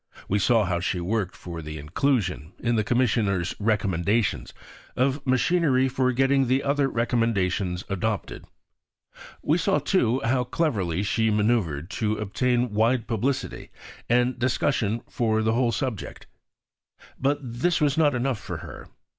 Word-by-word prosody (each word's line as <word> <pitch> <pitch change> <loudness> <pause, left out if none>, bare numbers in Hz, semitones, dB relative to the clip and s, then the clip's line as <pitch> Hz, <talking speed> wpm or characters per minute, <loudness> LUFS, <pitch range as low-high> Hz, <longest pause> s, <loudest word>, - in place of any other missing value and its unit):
We 105 - +1
saw 115 +1 +3
how 85 -1 -1
she 90 +1 -1
worked 95 +1 -2
for 85 -2 -7
the 75 0 -7
inclusion, 90 - -1
in 120 0 0
the 110 - +2
Commissioners' 105 -7 +1
recommendations, 100 0 0 0.4
of 135 +2 0
machinery 135 0 +3
for 130 0 +1
getting 135 +1 +2
the 130 +2 +1
other 140 0 +1
recommendations 105 -7 0
adopted; 105 +2 -3 1.0
we 160 +4 +2
saw, 150 - +2
too, 135 -5 +1
how 125 +2 +2
cleverly 105 - -1
she 110 +2 +1
man[oe]uvred 105 -9 +1
to 110 -1 -1
obtain 120 +3 0
wide 115 +2 +2
publicity 120 +5 -2 0.4
and 125 +1 +2
discussion 120 -3 0
for 110 -2 0
the 110 +1 +2
whole 120 0 +2
subject. 115 -2 -4 0.9
But 140 +2 +1
this 125 +8 0
was 145 -3 +2
not 150 -4 +3
enough 125 -2 -1
for - - -6
her. - - -10
115 Hz, 140 wpm, -25 LUFS, 100-130 Hz, 1.0 s, saw